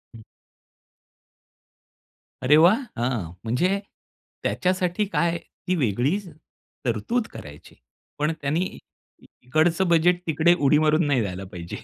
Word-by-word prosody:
हं. 110 - -12 2.2
अरे 130 +3 +5
वाह! 175 +9 +6 0.2
हां, 120 -9 -2
म्हणजे 175 - +1 0.6
त्याच्यासाठी 185 +2 0
काय 170 0 +1 0.3
ती 185 - +2
वेगळी 130 - +1 0.7
तरतूद 130 - -1
करायची. 75 0 -11 0.4
पण 150 +2 +1
त्यानी 155 +6 -1 0.6
इकडचं 160 +8 +1
बजेट 175 +1 +3
तिकडे 160 +2 +4
उडी 145 +1 +4
मारून 155 +1 +3
नाही 135 -4 +2
जायला 95 -1 -5
पाहिजे 85 -1 -7
155 Hz, 105 wpm, -24 LUFS, 120-175 Hz, 2.2 s, वाह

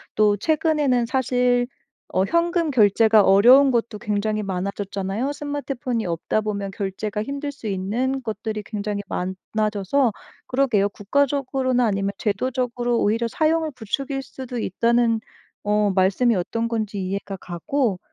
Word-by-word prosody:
또 210 -1 +4
최근에는 295 - +1
사실 250 -1 +2 0.5
어 185 - +3
현금 335 - +1
결제가 220 -2 +5
어려운 245 +9 +7
것도 235 -2 -1
굉장히 215 -1 -1
많아졌잖아요. 195 +5 -3
스마트폰이 275 -6 -3
없다보면 200 +4 -2
결제가 200 +2 -3
힘들 280 +3 -4
수 280 -5 -15
있는 225 +8 -1
것들이 220 -2 -4
굉장히 205 -1 -3
많아져서 210 +6 -1 0.3
그러게요 245 -7 +2
국가적으로나 260 +2 0
아니면 200 -2 0
제도적으로 240 +2 -1
오히려 230 +3 +1
사용을 315 +4 +1
부추길 270 +5 -3
수도 260 -2 -8
있다는 230 +2 +2 0.4
어 210 -1 +2
말씀이 195 +6 +3
어떤 230 +6 -1
건지 215 -3 -2
이해가 195 +1 -3
가고 190 - -1
225 Hz, 330 characters per minute, -23 LUFS, 200-260 Hz, 0.5 s, 어려운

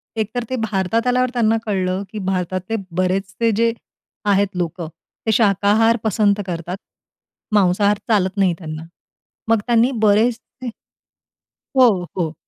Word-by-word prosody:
एकतर 225 +2 -2
ते 260 - -1
भारतात 210 +4 0
आल्यावर 250 0 +2
त्यांना 225 -2 +2
कळलं, 190 -2 -1
की 215 - -5
भारतातले 185 +2 -2 0.2
बरेचसे 190 +4 0
जे 230 0 +3 0.6
आहेत 200 0 +3
लोकं. 170 -1 -3 0.4
ते 220 - +2
शाकाहार 215 +2 +3
पसंत 210 -1 +2
करतात. 175 +1 -4 0.8
मांसाहार 205 +1 +3
चालत 200 -3 +1
नाही 190 -3 +3
त्यांना. 155 -2 -6 0.7
मग 225 -1 +4
त्यांनी 240 +1 +3
बरेचसे 230 +4 +1 1.1
हो, 235 -9 +5
हो. 165 -3 -1
205 Hz, 120 wpm, -20 LUFS, 185-225 Hz, 1.1 s, हो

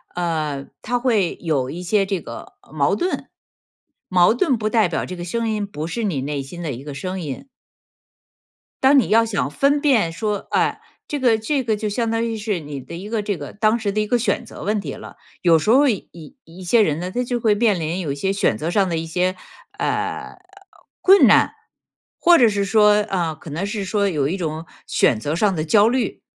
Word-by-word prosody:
呃， 155 -5 -2
它 245 - -1
会 220 -8 +1
有 140 -6 -1
一 175 +4 -6
些 195 +2 +2
这 190 -4 -2
个， 115 - -10
呃， - - -23
矛 145 +5 +2
盾。 360 - -3 0.8
矛 180 +1 +5
盾 260 0 +1
不 215 0 -1
代 220 -4 +3
表 165 - -2
这 185 - -7
个 175 - -6
声 230 +5 -2
音 210 -2 -2
不 155 -5 -6
是 225 +7 -4
你 150 -10 -1
内 140 0 -3
心 170 +6 -9
的 160 -4 -3
一 125 +2 -7
个 145 -1 -7
声 185 +6 -5
音。 150 - -6 1.4
当 270 +1 +6
你 - - 0
要 225 +1 +4
想 200 -10 -1
分 285 - +1
辨 230 - +3
说， 205 +4 -3
哎， - - +1 0.3
这 290 - -3
个 235 -4 +3
这 265 +5 -1
个 220 -2 0
就 210 0 -3
相 225 +2 -1
当 230 0 0
于 225 -1 -3
是 210 -4 -2
你 145 -2 -7
的 130 +6 -9
一 195 +5 -8
个 225 -2 -1
这 205 -2 -1
个 145 - -8
当 215 +2 +1
时 205 -2 -1
的 215 - -1
一 210 - +1
个 245 +2 +1
选 215 -4 -1
择 - - -10
问 210 +2 0
题 145 -8 -5
了。 - - -11 0.3
有 170 -2 +5
时 210 - -2
候 275 +4 +5
一 215 -7 -1
一 170 - -13
一 175 +3 -13
些 220 +6 +4
人 155 -5 +1
呢， 180 +1 -4
他 250 +5 -1
就 245 0 -2
会 220 -3 +2
面 210 -5 +2
临 165 +3 -2
有 160 -6 -3
一 - - -3
些 190 +7 -1
选 195 - +1
择 160 +6 -3
上 195 +1 +2
的 165 -2 -1
一 160 - -3
些， 180 +3 -1 0.4
呃， - - -2 0.6
困 390 +1 +7
难， - - +5 0.7
或 345 -1 +6
者 240 - +6
是 205 -1 -1
说， 210 +1 +5 0.2
呃， 170 -5 -1
可 155 - -12
能 165 +7 -3
是 205 0 -3
说 200 +1 0
有 150 -7 0
一 185 +6 -2
种 160 -2 -4 0.2
选 110 - +2
择 145 +7 -2
上 195 +1 +1
的 155 - -1
焦 205 +6 +4
虑。 255 +1 -2
195 Hz, 245 characters per minute, -21 LUFS, 165-225 Hz, 1.4 s, 困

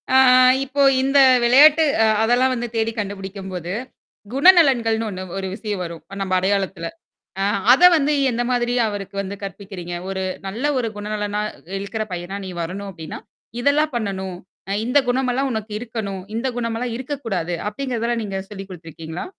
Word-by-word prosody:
ஆ. - - +8 0.5
இப்போ 280 +1 -2 0.2
இந்த 275 +1 +2 0.3
விளையாட்டு 295 +6 +7 0.2
அ - - +5 0.2
அதெல்லாம் 245 +3 +3
வந்து 240 0 -3
தேடி 225 0 +1
கண்டுபிடிக்கும்போது. 190 -3 -5 0.6
குணநலன்கள்னு 265 -9 +5
ஒண்ணு 185 -1 -6
ஒரு 190 - -3
விஷயம் 210 -4 -4
வரும் 165 -2 -8 0.2
நம்ம 190 -1 -2
அடையாளத்துல. 190 -3 -1 0.6
ஆ. - - +2 0.3
அத 270 - +4
வந்து 300 0 +1 0.2
எந்த 240 +1 -1
மாதிரி 245 0 +1
அவருக்கு 200 -1 -6
வந்து 200 +1 -6
கற்பிக்கிறீங்க? 190 -2 -7 0.2
ஒரு 190 0 -3 0.3
நல்ல 230 +8 -5
ஒரு 230 -2 -1
குணநலனா 210 0 -3 0.4
இழுக்கிற 215 +2 -4
பையனா 180 +3 -5
நீ - - -6
வரணும் 195 +4 -5
அப்படின்னா, 160 -2 -8 0.4
இதெல்லாம் 295 +1 +2
பண்ணணும். 190 -4 -3 0.3
அ - - 0
இந்த 250 +4 +4
குணமெல்லாம் 260 +1 0
உனக்கு 220 -1 -4
இருக்கணும், 215 -5 -5
இந்த 250 +3 -2
குணமல்லாம் 230 0 -2
இருக்கக்கூடாது. 225 - -3
அப்படிங்கிறதல்ல 235 -1 -2
நீங்க 195 -1 -4
சொல்லிக் 195 -1 -8
குடுத்துருக்கீங்களா? 165 -1 -8
210 Hz, 145 wpm, -21 LUFS, 190-245 Hz, 0.6 s, ஆ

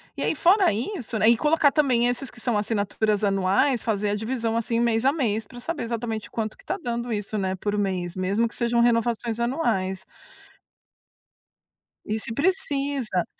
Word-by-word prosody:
e - - -6
aí - - +1
fora 370 +5 +4
isso, 235 - -3
né, 215 - +3
e 235 - +7
colocar 300 +3 +3
também 255 -5 +2
esses 245 +2 -2
que 240 - -15
são 240 -1 0
assinaturas 210 0 0
anuais, 200 +6 +2
fazer 210 -2 0
a - - 0
divisão, 225 +1 -2
assim, 230 0 0
mês 235 0 +1
a 270 - +6
mês 225 -8 -1
pra 245 - -11
saber 330 +3 -4
exatamente 230 -1 -4
quanto 220 -2 -3
que - - -20
tá - - -3
dando 240 -2 -3
isso, 210 0 -3
né, 190 -2 -1
por 205 +2 -2
mês, 185 -3 -2
mesmo 195 +5 +1
que - - -11
sejam 235 0 +1
renovações 235 -1 +1
anuais. 220 - -1 2.0
E 215 +1 -2
se 225 - -5
precisa. 280 - 0
230 Hz, 175 wpm, -25 LUFS, 210-250 Hz, 2.0 s, e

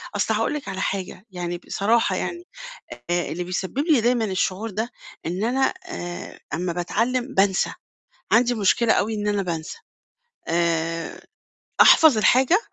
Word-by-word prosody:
أصل 205 +2 +1
هاقول 225 +6 0
لِك 300 - -5
على 190 0 -4
حاجة، 190 0 -4
يعني 175 -1 -4
بصراحة 220 +6 +1
يعني 350 0 -4 0.6
آآ 175 0 0
اللي 180 +2 -3
بيسبب 185 +7 -4
لي 295 -4 +3
دايمًا 240 0 +2
الشعور 195 +2 -1
ده 220 +4 -3 0.4
إن 180 +5 -2
أنا 260 +4 +1
آآ 175 - -7
أمّا 175 +2 -2
باتعلم 240 +9 -1
بانسى، 195 0 +2 0.6
عندي 245 +1 +4
مشكلة 220 +2 +3
أوي 220 +2 0
إن 210 0 -3
أنا 205 -1 0
بانسى. 165 - -5 0.7
آآ 165 -1 -1 0.6
أحفظ 310 -8 +7
الحاجة 260 - +4
205 Hz, 140 wpm, -23 LUFS, 180-240 Hz, 0.7 s, أحفظ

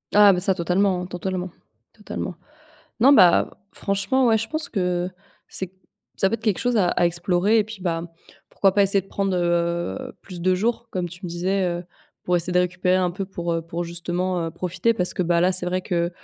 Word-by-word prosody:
Ah 205 -1 +8
bah 180 - +1
ça, 190 +1 +1
totalement, 180 +1 +1
hein, 180 - -4
totalement, 180 +1 -4 0.4
totalement. 205 -4 -6 0.7
Non, 270 +5 +7
bah, 185 -9 +5
franchement, 200 +8 0
ouais, 225 -1 +4
je 225 - -4
pense 310 -1 -2
que 180 -2 -1 0.4
c'est 190 - -4
qu 190 - -34 0.4
ça 195 - +3
peut - - -1
être 225 - -22
quelque 210 -5 +1
chose 245 -1 +1
à 180 - +3
à 175 - +2
explorer. 175 +5 +2
Et 215 - +3
puis, 220 -1 -9
bah, 165 -2 -1 0.5
pourquoi 195 -2 +2
pas 200 - +4
essayer 195 0 +3
de 195 - -22
prendre, 195 -2 -1
heu, 175 +8 -1
plus 180 -3 -9
de 185 +1 +2
jours, 230 +4 -1
comme 180 -1 -2
tu 175 - -11
me - - -5
disais, 185 +3 0 0.2
heu, - - -12 0.4
pour 180 0 +1
essayer 175 +1 -2
de - - +5
récupérer 180 +1 +1
un 180 -1 +1
peu 195 +2 -5
pour, 175 -3 -3
heu, 165 - 0
pour 170 +1 -4
justement, 175 +1 -2
heu, - - -4
profiter. 180 +6 -1
Parce 180 -4 -1
que, 185 - -1
bah, 170 0 +2
là, 185 - +4
c'est 180 -1 -1
vrai 185 +1 -1
que 170 -1 -1
185 Hz, 220 wpm, -23 LUFS, 175-200 Hz, 0.7 s, Ah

